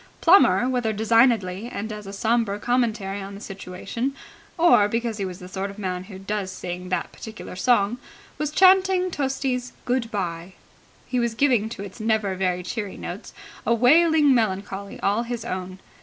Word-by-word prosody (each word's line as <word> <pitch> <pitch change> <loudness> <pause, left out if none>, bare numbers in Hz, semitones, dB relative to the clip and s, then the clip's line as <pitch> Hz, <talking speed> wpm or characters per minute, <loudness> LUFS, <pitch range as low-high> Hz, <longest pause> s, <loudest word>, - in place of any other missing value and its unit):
Plummer, 250 - +5
whether 245 -4 0
designedly 220 -2 +2
and 215 +2 -4
as 210 -1 -8
a - - -6
sombre 220 0 0
commentary 215 -4 -1
on 195 +1 -8
the - - -9
situation 200 +6 -5 0.4
or 330 -12 +5
because 230 0 -2
he 195 - -1
was 180 -1 -6
the 180 -2 -10
sort 190 +2 -4
of 200 - -11
man 185 -2 -3
who 190 -1 -10
does 195 0 -3
sing 180 0 -6
that 180 - -2
particular 220 -4 -9
song, 235 +2 +2 0.4
was 300 -1 -1
chanting 370 +2 +4
Tosti's 265 -3 -2
"Good 245 -2 0
bye". 180 -3 -4 0.5
He 250 - -1
was 235 -1 -1
giving 240 -5 +2
to 200 - -7
its 200 +3 -10
never 215 -3 +1
very 180 -1 -1
cheery 205 +2 -5
notes - - -7 0.3
a 235 - +2
wailing 300 +4 +5
melancholy 200 -3 -2
all 205 +3 +1
his 240 -1 -5
own. 185 -3 -5
215 Hz, 170 wpm, -24 LUFS, 195-245 Hz, 0.5 s, Plummer